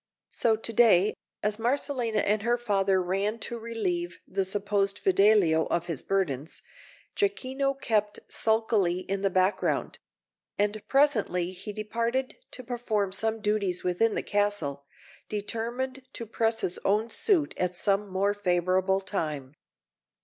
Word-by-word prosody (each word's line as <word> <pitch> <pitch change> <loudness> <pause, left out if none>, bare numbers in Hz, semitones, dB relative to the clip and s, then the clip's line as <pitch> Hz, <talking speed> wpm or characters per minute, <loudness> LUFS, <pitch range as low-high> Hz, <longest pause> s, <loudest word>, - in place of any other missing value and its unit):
So 225 -2 +2
to 225 +1 -4
day, 210 -4 +5 0.3
as 210 0 +1
Marcellina 245 -2 0
and 210 +1 +1
her 240 +2 +1
father 195 -5 +1
ran 195 +4 0
to 235 - -4
relieve 185 -7 -3
the 195 +1 -1
supposed 200 +1 0
Fidelio 200 - +4
of 170 0 -1
his 165 -6 -4
burdens, 160 -7 -2 0.5
Jacquino 275 -9 -1
kept 210 -4 0
sulkily 220 -5 +1
in 195 +1 -3
the 195 - +2
background; 185 +2 0 0.6
and 210 +1 0
presently 215 -11 +2
he 190 +3 -7
departed 230 +5 -2
to 255 - -9
perform 230 -5 -1
some 220 +3 -1
duties 205 -4 0
within 185 +5 +1
the - - -1
castle, 185 -10 -1 0.4
determined 235 +5 -3
to 230 - -5
press 225 0 0
his 180 - -2
own 215 +3 +1
suit 335 - +1
at 180 0 -1
some 200 +2 +1
more 195 +2 +1
favourable 185 0 +1
time. 155 -8 -3
205 Hz, 135 wpm, -28 LUFS, 185-230 Hz, 0.6 s, day